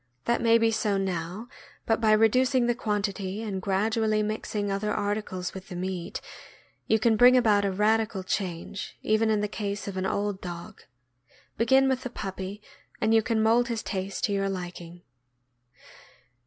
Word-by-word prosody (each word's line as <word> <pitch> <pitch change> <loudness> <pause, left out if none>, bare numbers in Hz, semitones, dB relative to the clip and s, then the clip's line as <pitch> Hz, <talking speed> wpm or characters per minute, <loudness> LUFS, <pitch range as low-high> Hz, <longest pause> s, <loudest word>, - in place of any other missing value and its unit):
That 235 - +1
may 230 0 +5
be 225 0 +2
so 210 -2 0
now, 185 +3 -3 0.4
but 225 -1 +1
by 220 -1 +4
reducing 250 +4 +3
the 240 - +2
quantity 205 -2 -2
and 195 -4 -3
gradually 215 +2 +1
mixing 210 -1 -2
other 205 +2 -1
articles 205 -3 -2
with 190 -1 -9
the 180 - -8
meat, 180 -1 -4 0.7
you 220 - +4
can 220 0 +3
bring 250 +3 +7
about 210 -4 +3
a 195 - +1
radical 210 0 +1
change, 185 0 -4
even 220 +1 +2
in 215 -1 +2
the 210 - 0
case 205 -1 -4
of 195 -1 -5
an 185 0 -1
old 205 -1 -2
dog. 175 +4 -8 0.7
Begin 265 +4 +4
with 260 -1 0
the 250 - -5
puppy, 195 -2 -6 0.4
and 220 +1 +2
you 225 - +6
can 220 -1 0
mold 235 +2 +4
his 230 -3 -3
taste 195 -1 -4
to - - +1
your 195 0 0
liking. 175 -2 -7
210 Hz, 170 wpm, -27 LUFS, 190-225 Hz, 0.7 s, bring